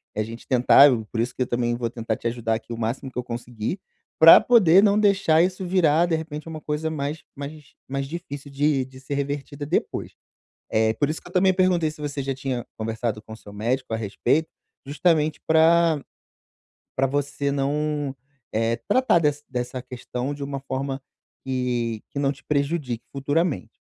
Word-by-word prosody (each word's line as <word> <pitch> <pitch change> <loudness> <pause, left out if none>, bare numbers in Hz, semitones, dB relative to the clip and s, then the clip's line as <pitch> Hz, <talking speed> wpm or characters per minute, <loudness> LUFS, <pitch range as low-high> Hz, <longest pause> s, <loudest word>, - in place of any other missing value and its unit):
a 110 - 0
gente 115 +2 -9
tentar, 130 +3 +7
e 115 -3 -1
por 110 +2 -5
isso 125 +1 -2
que - - -5
eu - - -6
também 120 0 0
vou 120 -1 -2
tentar 115 -1 -3
te 115 - -3
ajudar 115 -1 -1
aqui 115 +1 -8
o 115 - -6
máximo 120 +4 -3
que - - -12
eu 125 - -1
conseguir, 120 - -5 0.4
pra 165 0 +10
poder 195 -6 +6
não 210 0 +4
deixar 195 -6 +4
isso 185 +1 0
virar, 170 -3 +3
de 170 -2 +1
repente, 160 -1 -6
uma 160 -1 -6
coisa 150 +2 -2
mais 150 +1 -4
mais 145 +1 -9
mais 135 +1 -2
difícil 145 -3 -7
de 140 -1 +1
de 130 0 -14
ser 135 +1 -6
revertida 140 +1 -4
depois. 160 - -2 0.6
Eh, 110 0 +3
por 145 +6 0
isso 160 - -4
que - - -13
eu - - -16
também 190 +1 +4
perguntei 180 -4 +2
se 155 - -13
você 145 -1 -3
já 135 +1 -2
tinha 130 -2 -3
conversado 110 0 -2
com 110 0 -10
seu 105 -2 -13
médico 120 +4 -2
a - - +1
respeito, 115 +9 0 0.4
justamente 155 +1 +1
pra 160 0 +4 1.0
pra 135 +1 +3
você 140 +1 -1
não, 145 0 -1 0.4
eh, 115 +1 +1
tratar 255 -9 +4
des 150 -2 0
dessa 125 0 -4
questão 125 +2 -5
de 140 - -6
uma 140 -1 -4
forma 135 0 -4 0.4
que 120 -4 -1
que 140 - -5
não 140 -1 +1
te 145 0 -17
prejudique 140 -4 -1
futuramente. 145 - -1
140 Hz, 185 wpm, -24 LUFS, 125-155 Hz, 1.0 s, pra